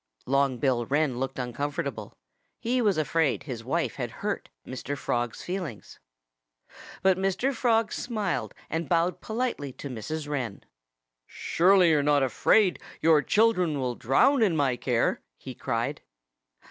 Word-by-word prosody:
Long 135 Hz, -1 st, +2 dB
Bill 125 Hz, -4 st, 0 dB
Wren 140 Hz, -3 st, +1 dB
looked 135 Hz, 0 st, -3 dB
uncomfortable. 130 Hz, +3 st, -4 dB, 0.4 s
He 250 Hz, +2 st, 0 dB
was 205 Hz, -6 st, +2 dB
afraid 155 Hz, -1 st, +1 dB
his 120 Hz, -6 st, -6 dB
wife 165 Hz, +8 st, -1 dB
had 120 Hz, -3 st, -3 dB, 0.2 s
hurt 210 Hz, -, -2 dB, 0.2 s
Mr. 135 Hz, +2 st, -5 dB
Frog's 120 Hz, -3 st, -2 dB
feelings. 175 Hz, -, -6 dB, 1.0 s
But 190 Hz, -1 st, +4 dB
Mr. 195 Hz, +8 st, 0 dB
Frog 230 Hz, -3 st, +1 dB
smiled 220 Hz, -4 st, -2 dB
and 165 Hz, -1 st, -3 dB
bowed 170 Hz, +1 st, +1 dB
politely 220 Hz, -, -2 dB
to 140 Hz, -, -8 dB
Mrs. 145 Hz, +6 st, -5 dB
Wren. 125 Hz, -9 st, -4 dB, 0.6 s
"Surely 180 Hz, 0 st, +3 dB
you're 150 Hz, -2 st, +4 dB
not 145 Hz, -1 st, +3 dB
afraid 185 Hz, -, +3 dB, 0.2 s
your 160 Hz, -1 st, +5 dB
children 180 Hz, -, +2 dB
will 125 Hz, -2 st, -1 dB
drown 135 Hz, -, +3 dB
in 195 Hz, -7 st, +3 dB
my 140 Hz, -5 st, +2 dB
care?" -, -, 0 dB, 0.2 s
he -, -, -8 dB
cried. -, -, -2 dB
155 Hz, 135 wpm, -27 LUFS, 135-195 Hz, 1.0 s, your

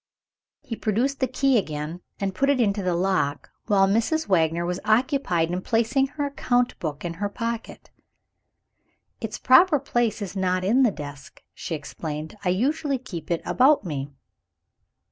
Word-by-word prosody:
He 255 Hz, -5 st, -5 dB
produced 240 Hz, +7 st, 0 dB
the 260 Hz, -, +1 dB
key 260 Hz, 0 st, +2 dB
again, 155 Hz, 0 st, -5 dB, 0.2 s
and 195 Hz, -1 st, -1 dB
put 275 Hz, +8 st, +1 dB
it 280 Hz, -2 st, +3 dB
into 205 Hz, -3 st, +1 dB
the 180 Hz, -2 st, 0 dB
lock 175 Hz, -6 st, 0 dB, 0.2 s
while 195 Hz, -2 st, +4 dB
Mrs. 230 Hz, +11 st, +1 dB
Wagner 170 Hz, -2 st, +2 dB
was 180 Hz, +1 st, -2 dB
occupied 215 Hz, -, +1 dB
in 180 Hz, +1 st, -2 dB
placing 235 Hz, +6 st, +1 dB
her 290 Hz, +1 st, -3 dB
account 245 Hz, -3 st, 0 dB
book 150 Hz, -1 st, -4 dB
in 170 Hz, -, -3 dB
her 205 Hz, -, 0 dB
pocket. 230 Hz, +2 st, -5 dB, 1.3 s
"Its 225 Hz, -2 st, -5 dB
proper 300 Hz, +5 st, +6 dB
place 240 Hz, -5 st, 0 dB
is 200 Hz, -2 st, -6 dB
not 185 Hz, -1 st, 0 dB
in 230 Hz, +8 st, +3 dB
the 250 Hz, -, +5 dB
desk," 145 Hz, -6 st, -9 dB
she 165 Hz, -, -4 dB
explained; 155 Hz, +1 st, -6 dB
"I 180 Hz, -, +1 dB
usually 275 Hz, -, 0 dB
keep 205 Hz, -, -8 dB
it 170 Hz, -1 st, -1 dB
about 270 Hz, -2 st, +4 dB
me." 145 Hz, -4 st, -4 dB
205 Hz, 160 wpm, -24 LUFS, 175-255 Hz, 1.3 s, proper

